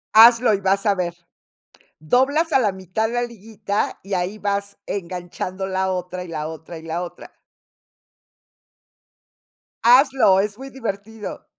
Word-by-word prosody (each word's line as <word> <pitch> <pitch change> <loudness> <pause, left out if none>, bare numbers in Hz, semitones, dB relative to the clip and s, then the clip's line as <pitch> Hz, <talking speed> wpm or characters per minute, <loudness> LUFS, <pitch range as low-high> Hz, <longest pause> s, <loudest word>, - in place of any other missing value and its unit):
Hazlo 230 +1 +8
y 200 - -1
vas 195 +2 +1
a 205 - +4
ver. 175 -2 -2 0.8
Doblas 275 - +2
a - - +5
la 215 -6 +2
mitad 190 +4 -2
la 240 0 0
liguita 215 -3 -3
y 195 - -9
ahí 180 +3 -2
vas 200 -1 -2
enganchando 185 0 -4
la 190 0 -1
otra, 180 0 -4
y - - -11
la 155 -2 -4
otra, 160 +1 -9
y - - -12
la 165 +2 -3
otra. 175 - -9 2.5
Hazlo, 250 -5 +6
es 205 +1 -1
muy 270 +2 -8
divertido. 220 -4 -6
200 Hz, 140 wpm, -22 LUFS, 180-225 Hz, 2.5 s, Hazlo